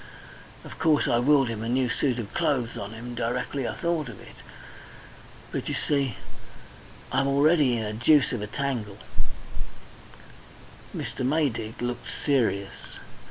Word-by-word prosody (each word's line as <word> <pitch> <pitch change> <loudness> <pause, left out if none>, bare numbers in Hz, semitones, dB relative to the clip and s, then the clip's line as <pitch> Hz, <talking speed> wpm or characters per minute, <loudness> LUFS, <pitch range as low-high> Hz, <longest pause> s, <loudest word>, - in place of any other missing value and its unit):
Of - - -10
course 155 -2 +4
I 120 - +3
willed 135 +1 +5
him 110 -2 -3
a 115 - -2
new 130 +1 +2
suit 125 0 +1
of 110 -5 -5
clothes 125 -5 +1
on 100 +2 -5
him 120 +2 -7
directly 125 +3 -1
I - - -3
thought 170 -6 -1
of 110 - -9
it. - - -12 1.2
But, - - -3
you - - -1
see, 140 -6 +1 1.0
I'm 135 +1 +2
already 140 -2 +4
in 110 - -1
a 105 0 -3
deuce 135 +6 +5
of 120 -5 -2
a 105 - -3
tangle 115 -4 -2 1.0
" - - -18
Mr. - - -3
Maydig 125 -6 0
looked 120 0 -3 0.2
serious. 115 -9 0
125 Hz, 150 wpm, -27 LUFS, 115-140 Hz, 1.2 s, willed